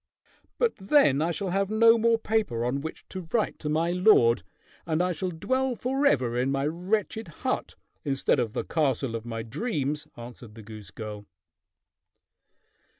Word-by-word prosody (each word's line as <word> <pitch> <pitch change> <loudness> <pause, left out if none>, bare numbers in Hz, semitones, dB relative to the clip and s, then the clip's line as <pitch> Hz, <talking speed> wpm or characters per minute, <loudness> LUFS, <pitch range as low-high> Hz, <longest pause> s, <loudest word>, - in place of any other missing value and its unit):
_] - - -38
"But 475 -2 +2
then 190 - +4
I 165 - +1
shall 185 +2 -2
have 195 +1 0
no 230 +1 +6
more 230 0 +3
paper 210 - -1
on 135 +3 -1
which 160 +2 -8
to 185 -3 -7
write 225 -3 0
to 150 - -4
my 165 +3 +1
lord, 175 - +5 0.4
and 160 -2 -1
I 180 +1 +1
shall 180 +2 -2
dwell 260 +10 -1
forever 240 - +1
in 125 +2 +1
my 135 0 0
wretched 195 +7 -2
hut 165 - -3 0.3
instead 135 0 +1
of 115 -3 -1
the - - -2
castle 135 -6 0
of 115 +1 -6
my 115 -1 -4
dreams," 150 - -3
answered 120 -2 -10
the 110 - -11
goose 105 -3 -10
girl. 105 -1 -8
160 Hz, 165 wpm, -27 LUFS, -, 0.4 s, no